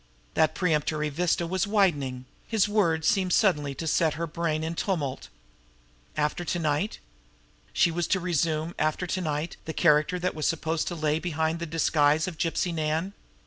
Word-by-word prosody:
That 155 - +2
premonitory 150 -3 0
vista 170 +3 0
was 185 +3 -1
widening; 145 -12 +1 0.2
his 220 -3 +2
words 170 -7 +1
seemed 185 -3 +2
suddenly 150 -10 +2
to 165 - -5
set 160 0 +2
her 165 +2 -2
brain 160 -1 -2
in 160 +1 -2
tumult. 160 -7 -2 0.9
After 150 +3 0
to 175 - -2
night! 160 +5 -1 0.7
She 170 - +3
was 170 0 -1
to 190 - +2
resume, 165 -2 0
after 155 +4 0
to 185 +1 -2
night, 155 0 -3
the 160 - -4
character 155 +1 +3
that 180 +1 -1
was 155 - -1
supposed 160 0 -1
to 175 - -3
lay 155 -1 0
behind 160 -1 -1
the 170 - -4
disguise 155 0 +2
of 170 -4 -6
Gypsy 175 0 0
Nan! 160 +4 -1
165 Hz, 170 wpm, -27 LUFS, 155-175 Hz, 0.9 s, She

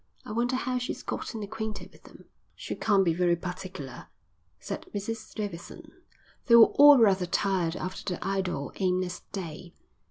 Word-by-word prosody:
I - - -7
wonder 240 +3 0
how 255 -1 -1
she's 250 - -5
gotten 220 -2 -5
acquainted 215 +1 -6
with - - -21
them." - - -15 0.3
"She - - -6
can't 200 -3 +2
be 165 - +3
very 175 0 +2
particular," 180 -6 -7 0.5
said - - -6
Mrs 220 +2 -5
Davidson. 200 -6 -7 0.6
They 235 - +7
were 230 -1 +8
all 290 0 +10
rather 195 -6 +4
tired 180 -3 0
after 185 0 -4
the - - -8
idle, 185 -7 -2
aimless 185 -1 0
day. 175 -2 -7
195 Hz, 155 wpm, -28 LUFS, 180-220 Hz, 0.6 s, all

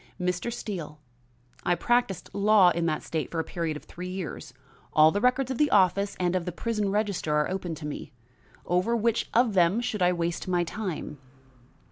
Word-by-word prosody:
"Mr. 180 +5 -1
Steele, 170 -10 -6 0.6
I 175 - +2
practised 240 0 0
law 200 -2 +5
in 170 0 0
that 155 -2 -1
state 160 -2 -3
for 165 - -3
a - - +1
period 165 -3 -3
of - - -13
three 180 +1 -8
years. 185 -4 -6 0.4
All 155 +1 +6
the 205 - -1
records 255 +1 +2
of 260 - -4
the 300 -1 +4
office 200 +1 +3
and 180 0 +1
of 180 -2 -1
the 180 - -3
prison 210 +2 -2
register 200 -7 0
are 150 +3 +1
open 180 -3 -3
to 155 - -8
me. 150 0 -6 0.5
Over 180 +7 +1
which 230 0 0
of 235 -2 +3
them 180 +3 +3
should 220 -4 -3
I 180 0 +4
waste 170 0 -2
my 175 -1 +1
time?" 175 -5 -5
180 Hz, 190 wpm, -27 LUFS, 170-210 Hz, 0.6 s, All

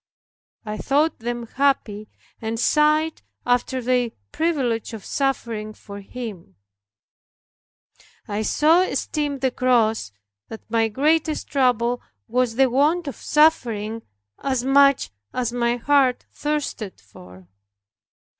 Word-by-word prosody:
I 215 0 -4
thought 295 +3 +1
them 240 0 -4
happy, 225 -5 0 0.3
and 225 0 -3
sighed 305 +4 +2 0.2
after 245 +1 0
their 250 -1 +1 0.2
privilege 260 -9 -1
of 220 - -8
suffering 235 -6 -2
for 200 -1 -10
Him, 200 - -8 1.7
I 205 +1 -2
so 310 +10 +4
esteemed 295 -6 -2
the 260 -1 +1
cross 225 - +1 0.4
that 220 - -10
my 225 -1 +3
greatest 305 +7 0
trouble 245 -3 +1 0.3
was 245 0 0
the 265 +1 +4
want 295 +7 +2
of 280 - -4
suffering 230 -8 +2 0.4
as 260 -3 -1
much 275 - +4 0.2
as 240 -2 -1
my 240 -1 +1
heart 260 0 +2
thirsted 290 - -3
for. 90 -2 -15
250 Hz, 110 wpm, -23 LUFS, 225-280 Hz, 1.7 s, so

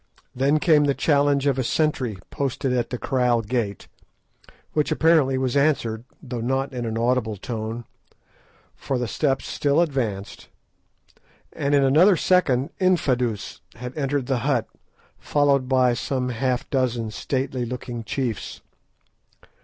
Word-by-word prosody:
Then 140 +4 +2
came 150 -2 +4
the 140 -1 +1
challenge 145 -2 +2
of 135 -2 +2
a - - +1
sentry 130 -6 0
posted 135 -1 -1
at 120 -2 0
the 125 - -3
kraal 125 -3 +1
gate, 105 -4 -3 0.9
which 150 -1 0
apparently 155 -5 +3
was 130 -1 -1
answered, 125 -6 +1 0.2
though 125 -3 -5
not 135 +3 -1
in 120 -2 -3
an 110 0 -3
audible 115 -2 0
tone, 115 +2 -5 0.9
for 135 - -3
the 125 -1 -2
steps 135 +2 0
still 145 +2 +1
advanced; 120 - -2 1.0
and 140 +1 0
in 140 - +4
another 165 +8 +5
second 145 -8 +2
Infadoos 125 - 0
had 125 +2 -7
entered 140 -2 -1
the 130 -1 0
hut, 130 -3 0 0.5
followed 140 -3 +1
by 130 -2 +4
some 125 +1 -2
half 125 +1 -1
dozen 120 -4 0
stately 130 +2 -2
looking 120 -1 -5
chiefs. 120 -1 -4
130 Hz, 135 wpm, -23 LUFS, 120-140 Hz, 1.0 s, another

